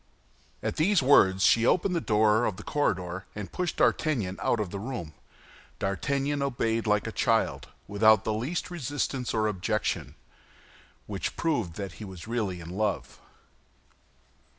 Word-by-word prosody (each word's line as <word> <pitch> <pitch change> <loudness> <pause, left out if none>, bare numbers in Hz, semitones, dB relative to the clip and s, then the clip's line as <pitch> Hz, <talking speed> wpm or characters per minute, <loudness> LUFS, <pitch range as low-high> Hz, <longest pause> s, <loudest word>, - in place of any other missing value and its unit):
At - - -2
these 175 0 +3
words 95 -8 +5
she 115 - +5
opened 180 +8 +2
the 170 - 0
door 110 0 +3
of 100 - -2
the 110 - -9
corridor, 95 -10 -1
and 105 -2 -6
pushed 180 -2 -2
D'Artagnan 115 - +1
out 120 - +1
of 100 -5 -2
the 100 - -4
room. 105 -9 -5 0.6
D'Artagnan 140 +9 -1
obeyed 115 -4 0
like 105 -1 +2
a - - -3
child, - - +1 0.2
without 110 +1 +4
the 110 - -1
least 140 +12 -3
resistance 140 -5 -2
or 110 -1 +1
objection, 95 -5 -1 0.9
which - - -4
proved 120 - -1
that 100 -1 -5
he - - -4
was 95 -2 -9
really 110 -6 -2
in 85 -1 -9
love. 105 +1 -2
110 Hz, 150 wpm, -28 LUFS, 95-140 Hz, 0.9 s, words